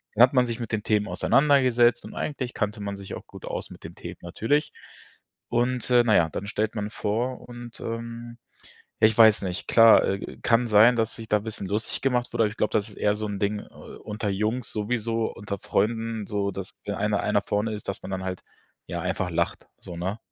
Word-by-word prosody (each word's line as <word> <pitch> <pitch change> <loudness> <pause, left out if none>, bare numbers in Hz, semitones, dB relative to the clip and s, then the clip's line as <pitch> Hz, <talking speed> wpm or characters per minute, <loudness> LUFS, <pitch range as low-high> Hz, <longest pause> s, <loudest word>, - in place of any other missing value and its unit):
Dann 115 - +7
hat 125 - +5
man 125 -2 +4
sich 115 0 -4
mit 115 -2 -5
den 105 - -1
Themen 105 -1 +1
auseinandergesetzt 125 -3 +3
und - - -9
eigentlich 130 -4 -3
kannte 105 0 -2
man 100 0 -4
sich 100 -1 -7
auch - - -10
gut - - -11
aus - - -5
mit - - -13
dem - - -9
Themen - - -8
natürlich. 115 - 0 0.8
Und, 125 +1 0
äh, 120 -1 +6
na 110 - +4
ja, 80 -2 +4
dann 100 - -5
stellt 110 +1 -1
man 105 -1 -2
vor 115 +5 -2
und, 120 -1 -10
ähm, 115 +1 -6 0.6
ja, 110 - +8
ich 110 - +1
weiß 110 -3 +7
nicht, 90 -1 -4
klar, 115 -1 +7
äh, 100 +1 -3
kann 120 +1 +3
sein, 110 +3 +6
dass 110 -1 0
sich 115 -1 -9
da 105 - +3
bisschen 105 -2 -6
lustig 105 +3 -2
gemacht 125 -2 0
wurde, 115 -1 +2
aber 105 - +1
ich 110 - -11
glaube, 105 - 0
das 105 0 +1
ist - - -14
eher 105 - +2
so 105 0 -4
'n 100 -1 -4
Ding, 105 +1 0
äh, - - -9
unter 105 0 -7
Jungs 110 +5 -1
sowieso, 115 +1 -1
unter 100 -1 -6
Freunden, 110 +1 -1
so, 100 -2 -1
dass 95 0 -7
der 100 -1 -2
eine 105 -1 +1
einer 105 -1 +1
vorne 105 +2 -1
ist, 105 - -8
dass 100 - -3
man 95 - -7
dann 95 0 -3
halt, 95 -1 -4 0.5
ja, 85 +1 -4
einfach 90 0 -1
lacht, 85 0 -2
so, 85 - -9
ne? 95 +5 -3
110 Hz, 225 wpm, -26 LUFS, 100-120 Hz, 0.8 s, ja